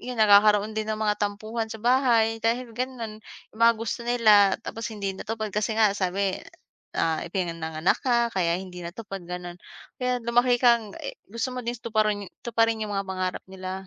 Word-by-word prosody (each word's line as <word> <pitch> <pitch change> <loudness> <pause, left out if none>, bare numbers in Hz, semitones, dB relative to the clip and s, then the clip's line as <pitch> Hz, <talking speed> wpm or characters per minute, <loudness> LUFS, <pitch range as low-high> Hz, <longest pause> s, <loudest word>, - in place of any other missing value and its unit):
'yon, 250 0 -6
nagkakaroon 210 0 +5
din 215 0 -2
ng 215 - -4
mga 210 -1 +1
tampuhan 215 +2 -2
sa 220 - -9
bahay 235 -3 +3
dahil 235 +1 0
gano'n, 240 -4 -4 0.3
yung 220 - -14
mga 230 0 +7
gusto 230 +1 -3
nila 215 -5 +5
tapos 225 -1 -5
hindi 200 -2 -3
natupad 220 +1 -4
kasi 210 +2 0
nga 215 -3 +5
sabi, 190 0 0 0.6
ah, 160 -1 0
ipinanganak 165 -2 -1
ka 235 -2 +2
kaya 175 -2 +1
hindi 180 -2 -9
natupad 195 +1 -7
gano'n. 180 0 -6 0.4
Kaya 250 0 0
lumaki 245 +1 +3
kang 235 -4 +3
e - - -6 0.2
gusto 230 +4 -2
mo 250 - -3
din 240 +1 -3
tuparan 215 -2 0 0.2
tuparin 225 -1 +1
yung 210 - -5
mga 195 0 -2
pangarap 185 -1 -3
nila, 190 0 -6
215 Hz, 175 wpm, -26 LUFS, 190-230 Hz, 0.6 s, mga